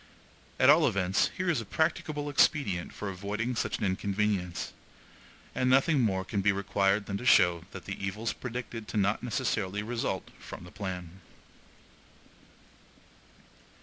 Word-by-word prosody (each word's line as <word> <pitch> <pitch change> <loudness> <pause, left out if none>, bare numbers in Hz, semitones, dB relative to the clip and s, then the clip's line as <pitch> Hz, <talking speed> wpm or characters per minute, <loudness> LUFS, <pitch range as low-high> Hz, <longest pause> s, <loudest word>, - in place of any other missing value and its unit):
At 130 - +5
all 155 +1 +5
events, 95 -4 +1
here 185 -1 -1
is 165 -8 +2
a - - -6
practicable 150 +4 -1
expedient 135 - +2
for 105 - -6
avoiding 105 +6 -3
such - - -1
an - - -2
inconvenience; 95 -2 -1 0.8
and 130 - +1
nothing 135 +2 +4
more 95 -5 +1
can 100 +1 -1
be 100 +1 +4
required 100 +1 +1
than 100 - -3
to 120 - -8
show 85 -7 +5
that 95 -4 -10
evils 100 +3 -3
predicted 120 -3 -6
to 95 - -4
not 105 +1 +2
necessarily 105 -3 -1
result 115 -5 -3
from - - -9
the 90 - -12
plan. 95 -2 -6
100 Hz, 140 wpm, -29 LUFS, 95-120 Hz, 0.8 s, At